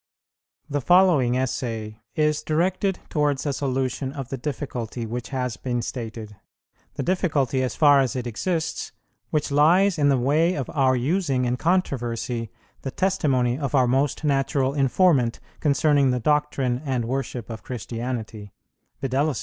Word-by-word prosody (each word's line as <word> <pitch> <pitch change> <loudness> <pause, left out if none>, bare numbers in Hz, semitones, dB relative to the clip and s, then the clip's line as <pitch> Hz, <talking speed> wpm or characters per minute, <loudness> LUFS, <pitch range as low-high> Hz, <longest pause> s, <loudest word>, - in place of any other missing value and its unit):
The 145 0 -2
following 165 -7 +4
Essay 115 -4 -3 0.2
is 150 -1 +1
directed 185 +4 0
towards 145 -3 0
a 145 - 0
solution 130 0 -2
of 135 -3 -6
the 135 - -4
difficulty 125 -4 -4
which 120 +2 -5
has 125 -4 -2
been 120 -2 -2
stated, 110 -4 -6 0.6
the - - -2
difficulty, 150 -8 +1
as 130 - -2
far 145 -2 +6
as 130 -3 0
it 125 -1 -3
exists, 160 - -2 0.4
which 150 -2 -1
lies 170 +5 +4
in 145 -1 +4
the 135 - +3
way 155 +8 +2
of 135 -4 -3
our 130 -3 +3
using 135 0 0
in 125 0 0
controversy 120 - -1 0.3
the - - -4
testimony 135 -8 +1
of 140 -1 -2
our 130 -2 +5
most 135 +5 0
natural 135 -2 +1
informant 135 -3 +2 0.2
concerning 145 -2 +3
the 125 0 +1
doctrine 140 -2 0
and 130 -5 -1
worship 125 -2 -3
of 110 - -7
Christianity, 115 -3 -5 0.5
viz. 135 +2 0
135 Hz, 145 wpm, -24 LUFS, 125-150 Hz, 0.6 s, far